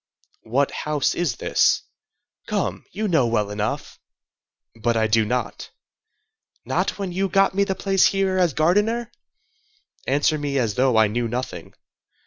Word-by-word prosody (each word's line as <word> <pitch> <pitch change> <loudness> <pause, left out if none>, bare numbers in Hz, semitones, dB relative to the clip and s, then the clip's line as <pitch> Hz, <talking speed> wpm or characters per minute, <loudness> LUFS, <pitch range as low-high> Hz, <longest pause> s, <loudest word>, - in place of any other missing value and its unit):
"What 135 +5 +1
house 150 -2 -1
is 170 -9 -1
this?" - - +2 0.6
"Come, - - -2
you 215 +3 -2
know 160 -10 +2
well 105 -3 0
enough." 105 +1 -4 0.8
"But 115 +1 0
I 110 - +2
do 110 0 +3
not." 125 +3 -3 1.0
"Not - - -1
when 195 -3 -4
you 190 +2 -1
got 195 +2 +3
me 200 +1 +2
the 190 -1 -2
place 195 -1 +3
here 195 -1 0
as 175 -6 +2
gardener?" 210 +9 +1 1.0
"Answer 145 +3 +2
me 145 -1 -2
as 115 -5 0
though 125 0 +2
I 110 - +6
knew 115 +3 -1
nothing." 115 -8 -5
140 Hz, 145 wpm, -23 LUFS, 115-190 Hz, 1.0 s, I